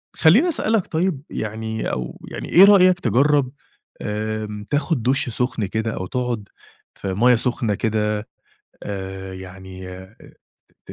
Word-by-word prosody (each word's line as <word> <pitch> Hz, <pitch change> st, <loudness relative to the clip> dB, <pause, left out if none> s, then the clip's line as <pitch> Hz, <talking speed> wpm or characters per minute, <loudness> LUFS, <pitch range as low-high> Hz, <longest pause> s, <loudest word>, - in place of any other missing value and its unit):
خليني 225 Hz, -, +5 dB
أسألك 225 Hz, -, +1 dB
طيب 165 Hz, -3 st, -1 dB
يعني 110 Hz, +1 st, -3 dB
أو 60 Hz, -1 st, -5 dB
يعني -, -, -6 dB
إيه 180 Hz, -, +8 dB
رأيك 185 Hz, -3 st, +6 dB
تجرَّب 135 Hz, -, +2 dB, 0.5 s
آمم 105 Hz, 0 st, -3 dB
تاخد 145 Hz, -3 st, 0 dB
دُشّ 130 Hz, +1 st, +1 dB
سُخن 125 Hz, -2 st, -1 dB
كده، 110 Hz, +3 st, -2 dB
أو 95 Hz, -, -4 dB
تقعد 120 Hz, -3 st, -3 dB, 0.5 s
في 95 Hz, -1 st, -4 dB
مَيَّة 120 Hz, +6 st, +5 dB
سخنة 115 Hz, -3 st, 0 dB
كده 105 Hz, 0 st, -1 dB, 0.5 s
آآ، 95 Hz, -1 st, -6 dB
يعني 95 Hz, 0 st, -9 dB
آآ، 95 Hz, +4 st, -11 dB, 0.7 s
ت -, -, -7 dB
110 Hz, 130 wpm, -22 LUFS, 100-135 Hz, 0.7 s, إيه